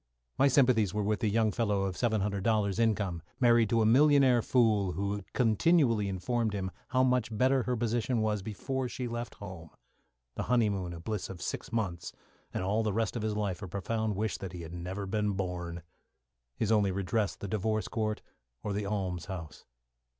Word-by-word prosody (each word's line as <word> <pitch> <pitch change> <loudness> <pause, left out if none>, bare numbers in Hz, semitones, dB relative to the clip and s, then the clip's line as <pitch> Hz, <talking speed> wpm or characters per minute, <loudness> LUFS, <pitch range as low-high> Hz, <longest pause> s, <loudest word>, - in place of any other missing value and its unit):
My 140 - +6
sympathies 125 -8 +3
were 105 - 0
with 105 +1 0
the 110 - +1
young 110 0 +2
fellow 105 -3 0
of 95 -1 -2
seven 110 -2 +1
hundred 100 -1 -1
dollars 105 -2 +1
income, 100 -7 +1 0.2
married 120 -3 +5
to 115 -1 +3
a - - +3
millionaire 135 0 +5
fool 105 -7 +2
who 100 +1 -2
continually 115 - +3
informed 110 +4 -1
him 95 -1 -3 0.2
how 130 0 +2
much 125 -3 +2
better 130 +3 +3
her 125 0 -1
position 120 +1 0
was 105 -2 0
before 125 +6 -3
she 125 0 -4
left 120 0 -5
home; 90 -5 -9 0.6
the - - -4
honeymoon 105 -7 +1
a 85 - -7
bliss 105 +3 -4
of 95 - -8
six - - -4
months, 95 -7 -2 0.4
and - - -3
all 105 +4 +1
the 110 -2 0
rest 115 +1 0
of 115 - -2
his 110 -1 -1
life 100 -4 -2
a 95 - -5
profound 110 +3 -2
wish 110 +2 -1
that 95 -2 -6
he 85 -1 -6
had 80 +1 -9
never 90 +3 -4
been 105 +1 0
born; 90 -3 -4 0.7
his 110 - 0
only 105 -3 +3
redress 100 +2 -1
the 100 - -7
divorce 110 +2 -1
court 110 -2 -2 0.4
or 105 - -2
the 100 0 -2
almshouse. 90 -4 -4
105 Hz, 185 wpm, -30 LUFS, 95-115 Hz, 0.7 s, My